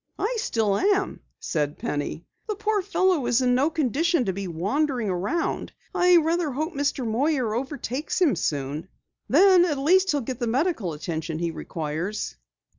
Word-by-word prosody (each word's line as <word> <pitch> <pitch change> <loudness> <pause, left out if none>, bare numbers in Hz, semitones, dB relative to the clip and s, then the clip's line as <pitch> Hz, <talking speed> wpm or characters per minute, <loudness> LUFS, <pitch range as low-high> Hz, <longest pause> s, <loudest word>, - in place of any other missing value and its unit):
"I 430 +5 -1
still 215 - +1
am," 395 0 +1 0.2
said 150 -3 -2
Penny. 145 +3 -3 0.2
"The 425 - -2
poor 425 0 0
fellow 370 -7 +1
is 245 +2 +2
in 250 0 +3
no 270 +5 +3
condition 320 0 +1
to 190 - -1
be 195 0 -4
wandering 225 - -1
around. 200 - -2 0.2
I 360 0 +5
rather 330 0 +1
hope 310 +6 -3
Mr. 280 -3 -1
Moyer 250 0 +1
overtakes 265 +4 -3
him 325 - +4
soon. 145 0 -2 0.4
Then 365 +4 +6
at 315 -5 0
least 370 +7 +3
he'll 290 -4 +1
get 250 0 -5
the 240 - -1
medical 245 - 0
attention 160 +1 -4
he 170 0 -1
requires." 160 - -4
265 Hz, 160 wpm, -25 LUFS, -, 0.4 s, Then